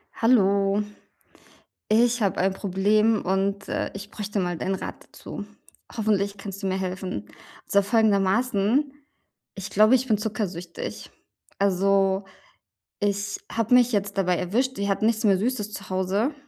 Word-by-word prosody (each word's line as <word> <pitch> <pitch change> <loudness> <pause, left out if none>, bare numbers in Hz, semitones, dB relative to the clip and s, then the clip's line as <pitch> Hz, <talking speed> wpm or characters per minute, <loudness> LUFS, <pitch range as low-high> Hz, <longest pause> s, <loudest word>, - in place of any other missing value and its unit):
Hallo. 200 -3 +3 1.0
Ich 235 +2 +3
habe 200 -3 +1
ein 190 +1 +2
Problem 210 +3 +2
und, 195 +2 -1
äh, - - -2
ich 200 +1 -8
bräuchte 210 -1 -4
mal 175 -2 -1
deinen 190 +4 -1
Rat - - -7
dazu. 205 - -8 0.5
Hoffentlich 205 -2 0
kannst 200 0 -8
du - - 0
mir 190 - 0
helfen. 185 - -4 0.4
Also 200 - +4
folgendermaßen: 220 +4 +2 0.6
„Ich 195 +1 -6
glaube, 215 +5 +5
ich 260 0 0
bin 215 -3 +3
zuckersüchtig.“ 200 -5 -5 0.5
Also, 195 0 +2 0.8
ich 205 0 -1
habe 230 +1 +1
mich 250 0 +5
jetzt 200 -1 -1
dabei 180 -2 +2
erwischt, 250 +8 -1
wir 200 0 -2
hatten 200 +2 +1
nichts 225 0 +1
mehr 195 -3 +4
Süßes 215 -1 -2
zu 200 -1 -8
Hause 190 +8 0
200 Hz, 140 wpm, -25 LUFS, 195-220 Hz, 1.0 s, glaube